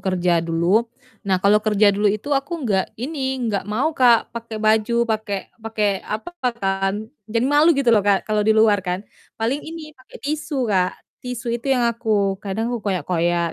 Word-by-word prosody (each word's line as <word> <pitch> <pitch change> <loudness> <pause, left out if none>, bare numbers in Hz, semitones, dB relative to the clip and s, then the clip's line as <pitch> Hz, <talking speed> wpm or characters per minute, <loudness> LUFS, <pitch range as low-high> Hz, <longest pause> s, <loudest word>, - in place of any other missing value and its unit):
kerja 180 -2 +1
dulu. 170 +7 +1 0.4
Nah, 190 - +3
kalau 205 +1 +5
kerja 210 -1 +3
dulu 205 +1 +2
itu 215 +8 -2
aku 285 +2 -1
nggak 195 -4 -1
ini, 265 +1 -3
nggak 200 -4 -1
mau 255 +10 0
Kak, 245 -4 +3
pakai 230 -1 -6
baju, 220 +2 +2
pakai 215 -3 -3
pakai 210 -3 -1
apa 220 +11 -5 0.3
kan, 195 -1 0 0.3
jadi 230 +2 0
malu 290 +4 +4
gitu 250 -4 +3
loh 215 - +5
Kak, 200 -1 +2
kalau 215 -1 0
di 220 +1 +3
luar 215 -2 +4
kan. 180 +1 -4 0.3
Paling 235 +6 -1
ini 315 -1 -9
pakai 255 -2 -15
tisu, 290 -2 -2
Kak. 185 -1 0 0.2
Tisu 245 -1 -4
itu 240 +3 -3
yang 250 -3 +3
aku 215 -4 0
kadang 220 +4 -3
aku 240 - -3
koyak-koyak 175 -2 0
220 Hz, 180 wpm, -21 LUFS, 195-245 Hz, 0.4 s, kalau